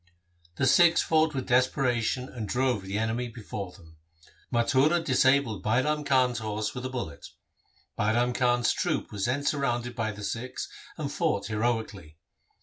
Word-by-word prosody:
The 130 - 0
Sikhs 170 +5 +5
fought 155 -1 +2
with 130 - -2
desperation 125 -1 +1
and 110 -6 -6
drove 125 -4 +1
the 95 +2 -4
enemy 115 +3 -1
before 105 -4 -7
them. 80 -3 -18 0.5
Mathura 135 +7 +3
disabled 130 - +2
Bairam 150 +7 +1
Khan's 130 -3 +2
horse 110 -1 -3
with 125 +1 -4
a - - -7
bullet. 115 - -6 0.7
Bairam 120 +4 +2
Khan's 120 -1 +2
troop - - -2
was 100 -2 -2
then 130 +4 -1
surrounded 120 -4 -1
by 115 -2 -1
the 105 0 -9
Sikhs 120 +5 -4 0.3
and - - -3
fought 100 - 0
heroically. 110 -8 -2
120 Hz, 145 wpm, -28 LUFS, 110-130 Hz, 0.7 s, Sikhs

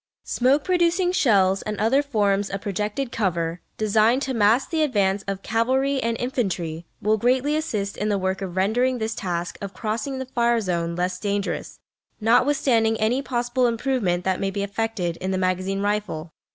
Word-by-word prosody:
Smoke 270 +4 +2
producing 355 0 +2
shells 195 - +3
and 210 -1 -4
other 230 +7 +3
forms 205 -7 +1
of 195 - -4
projected 210 +6 -2
cover, 170 -5 -1 0.2
designed 220 +5 +3
to 265 - -2
mask 225 +5 +3
the 320 -1 +1
advance 200 -9 +1
of 195 0 -4
cavalry 260 +4 +1
and 230 0 -1
infantry, 180 -10 -2 0.2
will 215 +1 +3
greatly 260 +6 +2
assist 210 -11 -2
in 210 - -1
the 205 - +1
work 190 0 -2
of 185 -1 -5
rendering 245 +7 +2
this 220 0 -2
task 175 -3 -4
of 200 -2 -6
crossing 235 +6 -3
the 260 - -4
fire 235 -2 +1
zone 170 -4 -2
less 180 +1 -1
dangerous, 200 0 -3 0.4
notwithstanding 230 -1 +3
any 230 +5 +1
possible 245 -1 0
improvement 230 -7 0
that 190 0 0
may 195 - 0
be 200 +1 -3
effected 200 -4 -2
in 185 - -4
the 190 - 0
magazine 185 +1 -1
rifle. 205 -6 -2
215 Hz, 170 wpm, -23 LUFS, 190-250 Hz, 0.4 s, shells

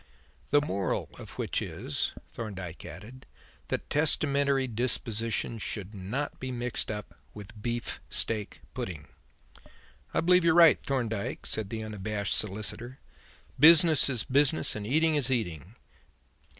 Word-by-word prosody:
"The 145 - +5
moral 100 - -2
of - - -10
which - - 0
is," - - -3 0.2
Thorndyke 95 -7 -7
added, 125 +5 -11 0.4
"that - - -3
testamentary 140 -2 +2
dispositions 115 -2 -1
should 100 -1 -4
not 105 +9 -4
be 130 - -4
mixed 120 0 -3
up 105 -2 -5 0.2
with 105 +1 -11
beef 120 +1 -3
steak 110 -3 0
pudding." 80 -5 -6 1.0
"I - - +1
believe 180 +1 +5
you're 165 -1 +4
right, 170 -3 +7
Thorndyke," 115 -7 -2
said 110 -3 -2
the 110 0 -4
unabashed 105 -1 -3
solicitor. 110 +5 -2 0.6
"Business 160 0 +7
is 125 -5 -1
business 140 +3 +2
and 105 -1 -5
eating 160 +5 +3
is 140 -4 +2
eating. 100 - -2
115 Hz, 125 wpm, -29 LUFS, 105-140 Hz, 1.0 s, right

